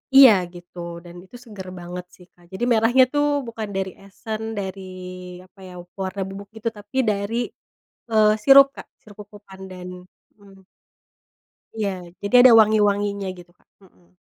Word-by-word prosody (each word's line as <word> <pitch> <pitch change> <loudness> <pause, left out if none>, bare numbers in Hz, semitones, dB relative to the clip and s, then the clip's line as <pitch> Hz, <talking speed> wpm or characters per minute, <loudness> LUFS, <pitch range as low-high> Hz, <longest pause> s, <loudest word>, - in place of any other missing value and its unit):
Iya 270 -4 +10 0.2
gitu 175 0 -15 0.3
dan 175 0 -13
itu 190 - -17
seger 205 -5 -10
banget 180 +1 -7
sih 180 - -18
Kak. 175 0 -24
Jadi 190 +5 -5
merahnya 235 +3 +4
tuh 290 0 +2 0.2
bukan 225 -2 -6
dari 190 -1 -2
esen, 215 +2 -7 0.2
dari 190 0 -6 0.6
apa 195 +2 -26
ya, 180 - -11 0.3
warna 190 +1 -4
bubuk 200 +1 -9
gitu, 220 +1 -3
tapi 205 +5 -9
dari, 200 +2 -2 0.8
eee, 215 -1 +5
sirup 275 0 +8
Kak, - - -10
sirup 205 -2 -16
cocopandan, 190 -3 -11 0.5
mmm. 195 -1 -19 1.1
Iya. 215 -2 -1 0.3
Jadi 200 +5 0
ada 250 - +9
wangi-wanginya 205 -2 +2
gitu 175 0 -15
Kak. - - -35 0.2
Mhm. 180 -1 -26
200 Hz, 145 wpm, -22 LUFS, 190-220 Hz, 1.1 s, Iya